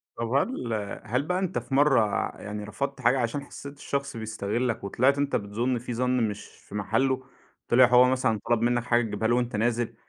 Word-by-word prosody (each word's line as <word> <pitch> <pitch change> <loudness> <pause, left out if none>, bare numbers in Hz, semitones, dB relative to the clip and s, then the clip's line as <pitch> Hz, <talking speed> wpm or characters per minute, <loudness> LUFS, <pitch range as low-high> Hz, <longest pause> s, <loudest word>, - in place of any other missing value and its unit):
طَب 115 0 -3
وهل 130 - -1 0.3
هل 125 +6 0
بقى 180 +4 -1
أنت 185 -9 -2
في 120 +3 -9
مرّة 135 -5 +5 0.4
يعني 105 0 -5
رفضت 135 +6 -4
حاجة 125 +3 +3
عشان 120 +4 -1
حسيت 140 0 -10
الشخص 140 -3 -3
بيستغلك، 110 +2 -2
وطلعت 130 +8 +2
أنت 140 0 0
بتظُن 115 +5 -1
فيه 120 +1 -5
ظَنّ 125 -2 +1
مش 105 - -7
في - - -14
محلُّه؟ 130 +6 0 0.4
طِلِع 125 +2 +6
هو 125 +1 +6
مثلًا 115 -5 +1
طلب 120 -1 +3
منك 120 0 +1
حاجة 120 -1 +2
تجيبها 110 -1 -2
له 120 - +3
وأنت 120 -2 -1
نازل، 120 +1 0
120 Hz, 190 wpm, -27 LUFS, 110-130 Hz, 0.4 s, طِلِع